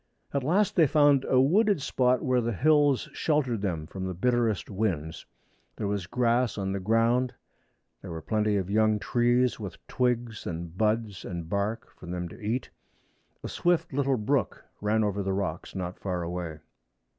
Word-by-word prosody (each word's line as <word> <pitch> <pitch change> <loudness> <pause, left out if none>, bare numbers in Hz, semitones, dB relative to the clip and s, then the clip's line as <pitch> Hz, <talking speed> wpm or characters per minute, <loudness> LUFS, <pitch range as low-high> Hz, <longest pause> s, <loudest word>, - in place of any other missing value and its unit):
At 140 -2 0
last 185 +8 +2
they 160 -3 +5
found 145 -2 +4
a 130 - +3
wooded 195 - +4
spot 125 -2 +1
where 125 -1 +2
the 120 0 -1
hills 145 - +3
sheltered 135 -8 0
them 85 -6 -2
from 95 +3 -5
the 95 - -4
bitterest 115 0 +1
winds. 95 -7 -3 0.5
There - - -4
was 100 -3 -2
grass 120 +1 +1
on 95 -1 -2
the 100 - -2
ground. 115 +5 +2 0.7
There 95 - -9
were 80 -2 -6
plenty 105 -1 +1
of 95 -2 -2
young 110 +1 +3
trees 120 +3 +2
with 100 -6 -6
twigs 120 -3 -1
and 85 0 -5
buds 110 -1 0
and 85 -3 -5
bark 100 +5 -2
for 90 - -12
them 90 0 -3
to 115 - -13
eat. 115 +5 -2 0.7
A - - -3
swift 175 -4 0
little 135 -1 +1
brook 130 +5 -1 0.2
ran 110 +1 +2
over 100 -1 -1
the 95 0 -1
rocks 95 -4 -3
not 90 -1 -4
far 90 -3 -2
away. 85 -2 -4
110 Hz, 170 wpm, -28 LUFS, 95-125 Hz, 0.7 s, they